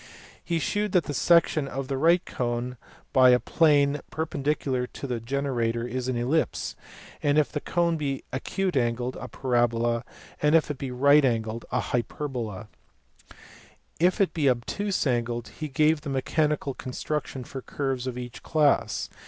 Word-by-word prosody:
He 170 - -1
shewed 205 +5 -1
that 180 -3 +4
the 145 - -4
section 160 -2 +3
of 135 0 -5
a - - +1
right 170 +6 +3
cone 120 0 -3 0.4
by 130 -1 +7
a 125 0 +6
plane 145 -2 +3
perpen 160 -3 -3
dicular 135 -3 0
to 135 -3 -4
a 120 - -2
generator 120 -2 -1
is 125 +1 -3
an 130 -2 -1
ellipse, 135 +7 0 0.5
if 145 0 +2
the 150 - -2
cone 170 +1 0
be 140 -3 -3
acute 185 +6 -2
angled; 120 0 0
a - - -5
parabola, 120 -2 +1 0.4
if 150 +1 +4
it 140 - -7
be 135 - -4
right 140 +4 +5
angled; 115 -2 -1
and 125 - +1
a - - +1
hyperbola, 120 -4 -3 1.3
if 180 +5 +3
it 195 - +2
be 145 -5 +2
obtuse 185 - -1
angled; 120 -2 0
and - - -19
he 155 - -3
gave 150 +2 +2
a 150 - -4
mechanical 145 +1 0
construction 135 +1 -4
for 135 +2 -7
curves 130 -2 -3
of 125 -1 -4
each 125 -1 -7
class. 150 -3 +1
135 Hz, 160 wpm, -26 LUFS, 125-150 Hz, 1.3 s, by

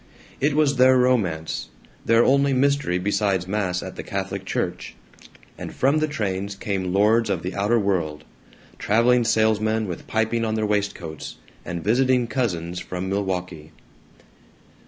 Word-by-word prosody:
It 145 +1 +1
was 145 -3 +2
their 130 +1 +6
romance; 100 -11 0 0.3
their 115 +1 +4
only 140 +1 +3
mystery 140 -8 +1
besides 100 -1 0
mass 95 -3 -1
at - - -8
the - - -4
Catholic - - -4
Church; - - -3 0.6
and - - -6
from 140 +4 +2
the 155 - +1
trains 100 -7 -3
came 95 -3 -3
lords 110 +4 +3
of 85 - -1
the 90 - -4
outer 105 +4 +1
world 85 -8 -1 0.6
traveling 120 +3 +3
salesmen 110 -1 +1
with 90 - -7
piping 110 +1 0
on 110 -1 -1
their 110 -1 0
waistcoats, 100 -7 -3 0.3
and 85 -1 -5
visiting 125 +3 +2
cousins 90 -9 -2
from 90 +1 -5
Milwaukee. 90 -5 -3
105 Hz, 140 wpm, -23 LUFS, 90-120 Hz, 0.6 s, their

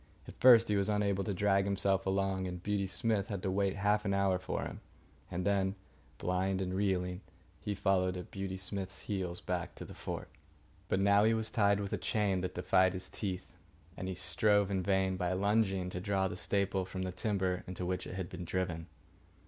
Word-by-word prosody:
At - - -11
first 115 -3 +8
he 105 - +1
was 100 +1 +2
unable 100 -2 +1
to 100 - -2
drag 100 +1 +2
himself 95 -1 +1
along, 95 -1 0
and 90 -1 -6
Beauty 100 -1 0
Smith 105 0 0
had 100 -3 -4
to 95 - 0
wait 100 0 +1
half 105 +1 +2
an 100 -2 0
hour 95 -2 +2
for 95 - -3
him. - - -6 0.5
And 90 +1 -3
then, 100 -1 +1 0.4
blind 95 +1 0
and 90 -1 -2
reeling, 95 -2 0 0.4
he 105 - -2
followed 95 -2 +1
at 90 - -8
Beauty 95 -1 -4
Smith's 95 0 -5
heels 90 -4 -3
back 90 -2 -3
to - - -8
the - - -10
fort. - - -6 0.6
But 95 - +2
now 100 +1 +5
he 110 +1 +4
was 110 0 +1
tied 100 -3 +3
with 100 -1 -3
a - - +1
chain 100 -4 +1
that 90 0 -4
defied 95 +1 +3
his 95 -1 -6
teeth, 95 -3 -4 0.5
and 95 - -5
he 95 - -3
strove 100 +3 +2
in 95 -1 +1
vain, 95 -1 +1
by 90 -1 0
lunging, 95 -2 +1
to 90 - -4
draw 95 0 +1
the - - -5
staple 100 0 0
from 95 0 -5
the 95 - -2
timber 95 -1 -1
into 90 0 -4
which 90 0 -2
it - - -6
was 90 -1 -5
driven. 85 -1 -2
95 Hz, 205 wpm, -33 LUFS, 90-100 Hz, 0.6 s, first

